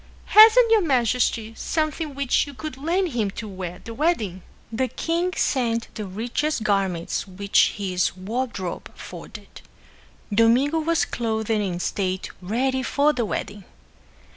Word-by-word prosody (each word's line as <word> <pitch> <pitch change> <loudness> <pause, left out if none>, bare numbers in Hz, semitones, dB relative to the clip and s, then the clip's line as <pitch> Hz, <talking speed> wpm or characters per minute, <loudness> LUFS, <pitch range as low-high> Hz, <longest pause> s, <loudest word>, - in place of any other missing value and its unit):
Hasn't 450 +2 +8
your 445 -2 +6
majesty 245 - +1
something 310 0 -2
which 280 +1 +1
you 285 - -10
could 310 0 -6
lend 340 +7 0
him 230 -7 -1
to 220 - -5
wear 185 -3 -6
at 180 - -18
the 230 - -6
wedding?" 225 - 0 0.3
The 255 +3 0
king 340 +6 -1
sent 230 -4 0
the 215 -3 -5
richest 235 +7 -2
garments 195 -4 -1
which 200 +1 +2
his 185 -3 -1
wardrobe 205 -2 -4
afforded. - - -11 0.7
Domingo 245 +8 +4
was 330 +1 +1
clothed 220 -2 -2
in 200 -5 0
state 185 +1 -2
ready 260 +7 0
for 290 +3 +2
the 240 -4 -1
wedding. 205 -1 -4
235 Hz, 140 wpm, -23 LUFS, 200-295 Hz, 0.7 s, Hasn't